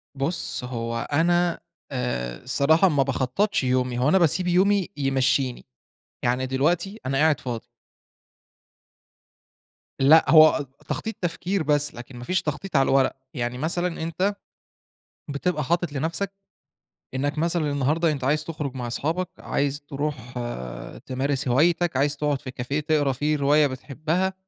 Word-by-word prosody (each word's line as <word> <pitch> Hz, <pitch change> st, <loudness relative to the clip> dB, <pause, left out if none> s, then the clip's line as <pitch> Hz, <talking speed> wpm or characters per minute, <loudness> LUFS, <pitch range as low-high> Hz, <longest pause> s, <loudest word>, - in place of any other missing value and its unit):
بُص 140 Hz, 0 st, -1 dB
هو 115 Hz, -1 st, -3 dB
أنا 175 Hz, +2 st, +2 dB, 0.3 s
آآ 120 Hz, -, -2 dB
الصراحة 160 Hz, +8 st, +4 dB
ما 145 Hz, -4 st, +2 dB
باخطّطش 135 Hz, +9 st, 0 dB
يومي، 125 Hz, -1 st, 0 dB
هو 130 Hz, +4 st, +3 dB
أنا 190 Hz, -, +5 dB
باسيب 175 Hz, +1 st, +2 dB
يومي 190 Hz, +2 st, +3 dB
يمشّيني، 135 Hz, -2 st, +1 dB, 0.6 s
يعني 125 Hz, +1 st, +1 dB
دلوقتي 170 Hz, -, 0 dB
أنا 135 Hz, +1 st, 0 dB
قاعد 155 Hz, +1 st, +3 dB
فاضي. 120 Hz, -3 st, -5 dB, 2.3 s
لأ، 155 Hz, +4 st, +6 dB
هو 155 Hz, -2 st, +7 dB, 0.2 s
تخطيط 225 Hz, 0 st, -3 dB
تفكير 180 Hz, +1 st, -1 dB
بس 150 Hz, 0 st, +1 dB
لكن 120 Hz, +1 st, -10 dB
ما 120 Hz, -, -8 dB
فيش 185 Hz, +8 st, 0 dB
تخطيط 155 Hz, +4 st, -4 dB
على 135 Hz, -1 st, +4 dB
الورق، 135 Hz, 0 st, +3 dB, 0.2 s
يعني 120 Hz, -2 st, -3 dB
مثلًا 170 Hz, +4 st, -1 dB
أنت 180 Hz, +5 st, -1 dB, 0.9 s
بتبقى 150 Hz, +2 st, -1 dB
حاطط 170 Hz, -1 st, 0 dB
لنفْسك، 165 Hz, +7 st, -2 dB, 0.8 s
إنك 145 Hz, +3 st, -1 dB
مثلًا 165 Hz, -2 st, +1 dB
النهارده 150 Hz, +4 st, +1 dB
أنت 140 Hz, -3 st, -4 dB
عايز 150 Hz, +3 st, +1 dB
تخرج 150 Hz, -4 st, -5 dB
مع 125 Hz, -2 st, -4 dB
أصحابك، 160 Hz, +9 st, -1 dB
عايز 145 Hz, +1 st, -1 dB
تروح 140 Hz, -4 st, -5 dB, 0.7 s
تمارس 135 Hz, +1 st, -1 dB
هوايتك، 165 Hz, +4 st, +2 dB
عايز 145 Hz, +2 st, +1 dB
تقعد 145 Hz, -2 st, -1 dB
في 130 Hz, -, -7 dB
كافيه 130 Hz, +4 st, -3 dB
تقرا 150 Hz, -2 st, +1 dB
فيه 150 Hz, +4 st, 0 dB
رواية 145 Hz, +1 st, +4 dB
بتحبّها 155 Hz, +8 st, -2 dB
145 Hz, 135 wpm, -24 LUFS, 130-165 Hz, 2.3 s, هو